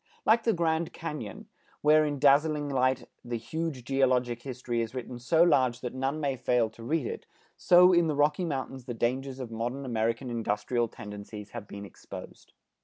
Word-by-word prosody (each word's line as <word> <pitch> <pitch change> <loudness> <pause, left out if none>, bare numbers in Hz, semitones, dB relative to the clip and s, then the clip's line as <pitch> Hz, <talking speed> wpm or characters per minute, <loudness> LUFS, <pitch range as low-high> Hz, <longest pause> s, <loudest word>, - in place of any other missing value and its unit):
Like 230 +1 +4
the 225 - +3
Grand 165 -1 0
Cañon, 150 - -6 0.4
where 155 +1 +5
in 145 -1 -2
dazzling 145 +1 +3
light 130 -1 +1 0.2
the 120 -1 -3
huge 155 +2 -4
geologic 125 -2 +1
history 125 -2 -3
is 115 +2 -4
written 125 -1 -6
so 160 +8 +4
large 130 -7 +3
that 125 - -4
none 135 +3 -2
may 140 -3 0
fail 120 -2 +1
to 110 - -15
read 150 +4 -1
it, - - -6 0.3
so 180 +1 +6
in 170 -1 +4
the 155 - 0
Rocky 150 +4 +2
Mountains 135 -5 -4
the 120 -2 -5
dangers 130 +3 -1
of 125 -3 -6
modern 120 +5 -3
American 115 +1 -1
industrial 115 +1 0
tendencies 105 0 -9
have 115 -4 -7
been 100 0 -8
exposed. - - -11
130 Hz, 180 wpm, -29 LUFS, 120-150 Hz, 0.4 s, so